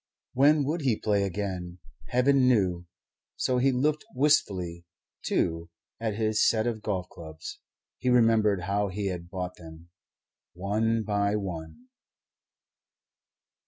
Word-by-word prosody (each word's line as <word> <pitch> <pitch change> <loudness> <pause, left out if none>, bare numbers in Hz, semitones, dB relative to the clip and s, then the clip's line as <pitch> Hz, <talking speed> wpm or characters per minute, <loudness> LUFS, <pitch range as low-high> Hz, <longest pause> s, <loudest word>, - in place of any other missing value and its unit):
When 145 +3 +4
would 155 +5 -1
he 130 -6 +2
play 105 -2 +1
again? 90 -2 -4 0.3
Heaven 130 +1 +3
knew! 90 -8 +2 0.5
So 125 -1 0
he 135 +2 +3
looked 150 +4 0
wistfully, 95 - +1 0.4
too, 85 0 -1 0.3
at 110 -2 -2
his 110 0 +1
set 110 -1 +3
of 115 -3 -2
golf 95 -4 -2
clubs. 80 -2 -9 0.4
He 125 - 0
remembered 115 -5 +4
how 100 +3 0
he 100 +1 -3
had 85 -2 -6
bought 90 -1 -5
them 80 0 -13 0.6
one 110 +4 0
by 100 -1 0
one. 95 - -6
105 Hz, 125 wpm, -27 LUFS, 90-125 Hz, 0.6 s, When